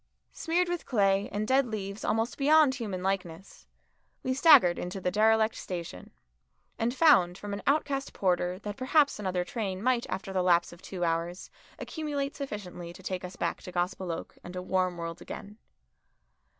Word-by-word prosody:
Smeared 350 +2 0
with 350 -1 -3
clay 200 -4 +2
and 210 +1 -2
dead 265 +1 +3
leaves 200 -2 -5
almost 225 +2 0
beyond 300 -1 +5
human 205 -8 -4
likeness, 190 -2 -4 0.6
we 260 - 0
staggered 270 - +6
into 180 +2 -4
the 180 -1 -1
derelict 220 +2 +3
station, 170 - -7 0.7
and 230 +1 +1
found 245 - +5
from 205 -1 -6
an 200 - -4
outcast 280 -1 +1
porter 180 -1 0
that 205 +1 -7
perhaps 280 0 +3
another 185 -3 -1
train 195 -5 -3
might 250 -1 +1
after 190 +1 -4
the 185 - +1
lapse 175 -1 +3
of 170 - -15
two 180 -2 -5
hours 170 +2 -2 0.3
accumulate 290 -3 -3
sufficiently 200 - -6
to 190 - -14
take 185 0 -3
us 180 +1 -7
back - - -2
to 180 - -9
Gospel 180 0 -2
Oak 165 - -7
and 175 - -9
a 180 - -3
warm 185 -1 0
world 165 0 -6
again. 210 +2 -9
195 Hz, 170 wpm, -29 LUFS, 180-255 Hz, 0.7 s, staggered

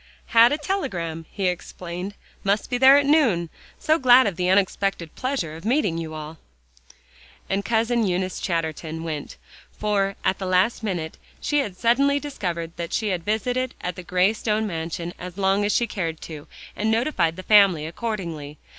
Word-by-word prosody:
"Had 230 +1 +7
a 290 - +1
telegram," 180 - -3
he 195 - -3
explained; 180 +2 -5 0.3
"must 200 +6 0
be 245 - 0
there 265 +2 +8
at 285 - +2
noon. 235 - +3 0.3
So 315 +1 +2
glad 255 0 +7
of 200 -4 -1
the 180 +1 0
unexpected 190 -3 +1
pleasure 255 - -3
of 165 - -10
meeting 220 - +1
you 160 -1 -6
all." 155 0 -8 1.1
And 195 +1 -1
Cousin 230 0 +1
Eunice 185 0 -1
Chatterton 160 -1 -3
went; 155 -3 -5 0.3
for, 200 -2 0
at 190 - +1
the 190 - -3
last 185 +6 +2
minute, 175 -7 -3 0.2
she 295 - +1
had 205 -10 -3
suddenly 275 +6 +3
discovered 175 - -4
that 170 -1 -5
she 215 -2 0
had 180 -3 -2
visited 245 +5 -1
at 180 -1 -4
the - - -7
gray 180 +3 +2
stone 220 0 -1
mansion 170 -1 -4
as 180 +1 -8
long 195 +1 +2
as 205 - +1
she 235 - +2
cared 165 -7 -4
to, 150 -3 -9 0.3
and 215 +1 -1
notified 220 - +1
the 185 - -8
family 195 -7 +5
accordingly. 165 -6 -5
195 Hz, 170 wpm, -24 LUFS, 170-230 Hz, 1.1 s, there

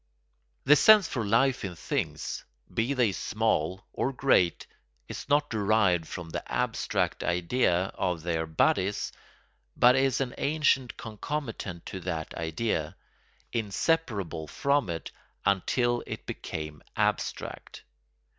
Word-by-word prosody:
The 145 +3 +8
sense 210 +3 +7
for 120 - -2
life 125 +5 +2
in 95 -3 -4
things, - - -3 0.3
be 120 +5 0
they 120 -5 +3
small 95 -3 -1
or 135 - 0
great, 125 - +2 0.4
is - - -7
not 145 +1 +2
derived 100 -6 +2
from 85 -2 -7
the - - -3
abstract - - 0
idea 90 +1 +1
of 85 -3 -2
their 80 -2 -1
bodies 95 +5 +1 0.7
but 125 +1 +7
is 135 -1 +2
an 130 -3 -2
ancient 140 -4 +1
concomitant 110 - -5
to 95 - -6
that 80 -3 -4
idea, 80 -1 -2 0.6
inseparable 105 - -1
from 140 - +1
it 80 -1 -4 0.3
until 120 +5 +2
it - - -6
became 75 -1 -6
abstract. - - -2
105 Hz, 115 wpm, -28 LUFS, 85-130 Hz, 0.7 s, The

